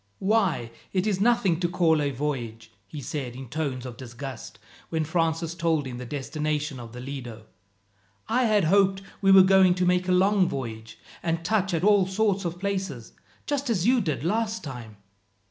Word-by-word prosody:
"Why, 190 - +1 0.2
it 185 0 +1
is 200 -3 0
nothing 200 -7 +3
to 175 - +1
call 165 -3 +2
a 145 - +1
voyage," 120 -5 -4 0.2
he 145 +7 -7
said 130 -2 -5
in 130 -2 -9
tones 135 -3 -3
of 120 -3 -8
disgust, 130 +2 -8 0.3
when 160 -1 -1
Francis 165 0 0
told 165 -4 0
him 125 -2 -6
the 125 - -7
destination 150 +1 -3
of 115 -2 -9
the 125 - -9
Lido. 125 -4 -7 0.8
"I 250 +2 +2
had 210 -3 +3
hoped 195 +3 +3 0.2
we 195 -1 +4
were 190 -1 +9
going 190 -1 +5
to 180 0 0
make 180 0 +2
a - - +1
long 190 0 +3
voyage, 115 -5 -6 0.2
and 165 -1 -2
touch 195 -1 +1
at 165 - -2
all 200 -2 +4
sorts 195 -1 0
of 170 +1 -4
places, 190 - -4 0.3
just 285 -2 -2
as 190 -6 +1
you 250 +1 +4
did 150 - -2
last 220 +4 -1
time." 120 -7 -8
165 Hz, 180 wpm, -26 LUFS, 135-195 Hz, 0.8 s, were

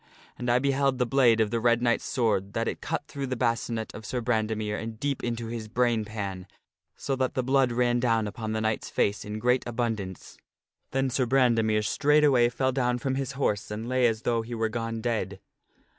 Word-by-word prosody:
And 125 - -4
I 120 - +4
beheld 135 0 +1
the 125 - +2
blade 120 -3 +4
of 110 -1 +2
the 115 - 0
Red 120 0 +3
Knight's 120 -1 +1
sword 105 -7 0
that 115 0 -1
it - - -3
cut 160 -1 -3
through 140 -3 -4
the 130 - -2
bascinet 115 -2 -1
of 110 - -9
Sir 125 +4 -3
Brandemere 110 -3 -1
and 110 -1 -6
deep 140 0 -2
into 120 -1 -2
his 115 -1 -5
brain 120 -1 +1
pan, 100 -3 -5 0.5
so 135 - -2
that 130 -1 -1
the 130 - 0
blood 130 -1 +3
ran 120 0 +2
down 115 -2 +2
upon 110 +1 -4
the 110 - -1
knight's 110 0 -1
face 100 +1 0
in 105 +1 -5
great 125 +3 +2
abundance. 110 -6 -4 0.5
Then 135 0 0
Sir 125 0 +1
Brandemere 115 -4 +3
straightway 145 -3 +4
fell 130 +2 0
down 125 -2 0
from 130 +2 -2
his 135 0 -2
horse 110 -7 -1
and 110 +2 -5
lay 130 -1 +3
as 115 -1 -2
though 115 -1 +1
he 120 +1 -6
were 110 -1 0
gone 115 0 -3
dead. 110 -5 -2
120 Hz, 205 wpm, -27 LUFS, 110-130 Hz, 0.5 s, I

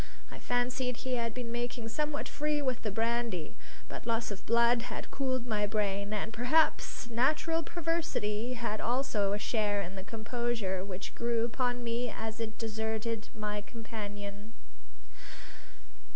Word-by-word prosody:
I - - -8
fancied 250 0 +1
he 255 - -2
had 235 -2 +1
been 240 0 -4
making 240 -1 -2
somewhat 300 +3 -1
free 300 0 +1
with 260 -4 0
the 215 - 0
brandy. 225 -5 0 0.3
But - - -6
loss 230 -1 +1
of 200 - -5
blood 235 +1 +5
had - - -5
cooled 260 -3 0
my 210 -3 +1
brain; 200 -1 0
and, 215 +1 -1
perhaps, 245 +2 +3
natural 305 +7 +3
perversity 300 -10 0
had 230 -3 -1
also 235 -5 +2
a - - +2
share 210 -2 +1
in 180 - -6
the 190 -1 -5
composure 225 -3 -1
which 190 -1 -5
grew 235 -1 +2
upon 245 +1 0
me 240 +1 0
as 220 0 -4
it 220 -1 -3
deserted 220 0 -1
my 210 -1 -1
companion. 205 -1 -6
230 Hz, 145 wpm, -33 LUFS, 210-245 Hz, 0.3 s, blood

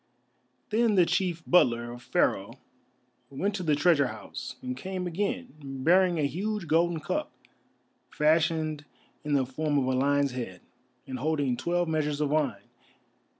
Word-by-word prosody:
Then 225 0 +3
the 180 -2 +6
chief 170 -2 -1
butler 120 -9 +3
of 120 0 -9
Pharaoh - - 0 0.8
went 195 +10 -2
to 195 - -3
the 155 -4 +2
treasure 150 -2 +4
house, 110 -3 -7
and 125 0 -3
came 185 +6 -4
again, 205 +9 -2
bearing 170 +7 +2
a 155 - 0
huge 200 +7 -2
golden 165 +1 +2
cup, - - -2 0.8
fashioned 155 -1 +1 0.4
in 150 -1 -2
the 135 -2 +3
form 145 +3 -1
of 135 - +2
a 130 - 0
lion's 140 +1 +2
head, 115 -8 -6 0.4
and 130 -2 -6
holding 145 -3 0
twelve 175 +7 0
measures 150 -2 -1
of 150 -2 +1
wine. 135 -10 0
155 Hz, 150 wpm, -28 LUFS, 135-175 Hz, 0.8 s, the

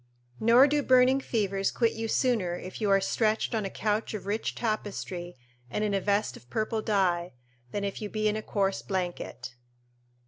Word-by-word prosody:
["Nor 235 +4 +7
do 295 +1 +2
burning 255 0 +5
fevers 195 -5 0
quit 230 -2 +1
you 225 0 -3
sooner 220 -8 +1
if 185 +4 -8
you 210 - +1
are 195 0 +5
stretched 215 +4 0
on 220 -3 0
a - - -2
couch 215 +2 -1
of 200 - -6
rich 210 +3 -2
tapestry 195 - -3 0.3
and 210 - -2
in 210 -1 0
a 195 - +1
vest 205 +2 0
of 120 - -15
purple 215 - -1
dye, 180 - +1 0.4
than 200 +9 -3
if 200 +1 -3
you 210 - -4
be 215 0 0
in 210 - +1
a 215 - -2
coarse 195 -2 -1
blanket." 175 -9 -4
210 Hz, 185 wpm, -28 LUFS, 195-225 Hz, 0.4 s, Nor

